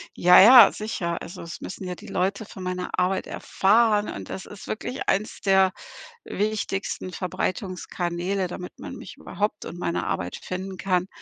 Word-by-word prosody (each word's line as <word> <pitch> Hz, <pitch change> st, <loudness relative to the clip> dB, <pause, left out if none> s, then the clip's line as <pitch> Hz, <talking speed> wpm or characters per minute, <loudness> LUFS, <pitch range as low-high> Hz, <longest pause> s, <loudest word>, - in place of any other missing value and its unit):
Ja, 180 Hz, +1 st, +7 dB
ja, 235 Hz, +1 st, +10 dB
sicher. 180 Hz, -6 st, -3 dB
Also, 170 Hz, -, -8 dB
es 165 Hz, -1 st, -8 dB
müssen 185 Hz, -, -7 dB
ja 180 Hz, -, -4 dB
die -, -, -13 dB
Leute 200 Hz, +3 st, -1 dB
von 190 Hz, -, -11 dB
meiner 180 Hz, 0 st, -3 dB
Arbeit 185 Hz, +1 st, +1 dB
erfahren 210 Hz, +1 st, +2 dB
und -, -, -7 dB
das 190 Hz, -, -6 dB
ist 205 Hz, -, -11 dB
wirklich 250 Hz, +4 st, -4 dB
eins 200 Hz, +3 st, 0 dB
der 190 Hz, -1 st, +4 dB, 0.5 s
wichtigsten 205 Hz, -3 st, -3 dB
Verbreitungskanäle, 185 Hz, 0 st, -3 dB
damit 180 Hz, 0 st, -8 dB
man -, -, -7 dB
mich -, -, -10 dB
überhaupt 210 Hz, 0 st, -3 dB
und 175 Hz, -, -8 dB
meine 170 Hz, -, -2 dB
Arbeit 90 Hz, 0 st, -3 dB
finden 190 Hz, +1 st, -6 dB
kann 185 Hz, -1 st, 0 dB
190 Hz, 160 wpm, -25 LUFS, 180-205 Hz, 0.5 s, ja